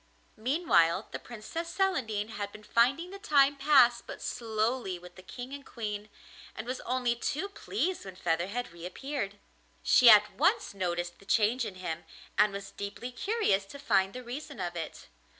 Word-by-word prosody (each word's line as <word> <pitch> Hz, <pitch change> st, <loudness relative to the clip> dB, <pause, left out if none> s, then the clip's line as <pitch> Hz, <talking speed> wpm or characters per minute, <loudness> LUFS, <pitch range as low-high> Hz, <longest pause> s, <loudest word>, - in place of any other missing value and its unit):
Meanwhile, 215 Hz, -, +2 dB
the -, -, -4 dB
Princess 245 Hz, +9 st, -6 dB
Celandine 230 Hz, -, 0 dB
had 205 Hz, -2 st, -4 dB
been 215 Hz, -, -12 dB
finding 275 Hz, -, +2 dB
the 395 Hz, -, -8 dB
time 285 Hz, -8 st, +4 dB
pass 270 Hz, -4 st, +5 dB
but -, -, -9 dB
slowly 220 Hz, -3 st, -1 dB
with 180 Hz, 0 st, -13 dB
the 185 Hz, -, -13 dB
King 245 Hz, +7 st, -8 dB
and 280 Hz, 0 st, -7 dB
Queen, 210 Hz, -4 st, -5 dB, 0.5 s
and 220 Hz, -, -5 dB
was 250 Hz, +1 st, -3 dB
only 250 Hz, -1 st, +1 dB
too 300 Hz, +9 st, -2 dB
pleased 395 Hz, -2 st, -2 dB
when 190 Hz, -2 st, -9 dB
Featherhead 180 Hz, +8 st, -1 dB
reappeared. 200 Hz, -, -5 dB, 0.5 s
She 245 Hz, -, +7 dB
at 210 Hz, -1 st, +7 dB
once 380 Hz, -, +2 dB
noticed 175 Hz, -2 st, -2 dB
the 195 Hz, -, -17 dB
change 225 Hz, +4 st, +2 dB
in 195 Hz, -, -6 dB
him, 170 Hz, -2 st, -5 dB, 0.3 s
and 210 Hz, +1 st, +4 dB
was 200 Hz, 0 st, -7 dB
deeply 200 Hz, +5 st, -6 dB
curious 320 Hz, -, +1 dB
to 280 Hz, -, -10 dB
find 195 Hz, -8 st, +2 dB
the 255 Hz, -, -7 dB
reason 280 Hz, +4 st, -7 dB
of 175 Hz, 0 st, -3 dB
it. 165 Hz, -2 st, -6 dB
230 Hz, 170 wpm, -30 LUFS, 195-275 Hz, 0.5 s, She